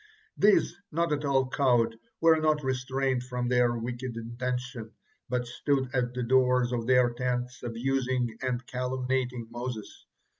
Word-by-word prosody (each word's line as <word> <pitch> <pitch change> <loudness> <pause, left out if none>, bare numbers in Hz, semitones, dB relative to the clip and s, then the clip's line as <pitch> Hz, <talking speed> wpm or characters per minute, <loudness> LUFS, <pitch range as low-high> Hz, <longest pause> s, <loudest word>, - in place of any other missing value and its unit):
These, 205 -4 +4 0.2
not 165 0 +1
at 145 0 -2
all 135 -2 +2
cowed, 120 -4 +2 0.2
were 165 -1 +5
not 155 -1 +2
restrained 130 0 0
from 125 -1 -3
their 125 -1 +3
wicked 120 +1 -4
intention, 125 0 -4 0.4
but 125 0 0
stood 130 +2 -1
at 125 -2 0
the 125 - -1
doors 125 0 +3
of 120 -2 -2
their 125 -1 +5
tents, 125 +1 -2
abusing 125 0 -1
and 125 -2 -2
calumniating 125 -1 -2
Moses. 120 -2 -6
125 Hz, 140 wpm, -28 LUFS, 120-130 Hz, 0.4 s, were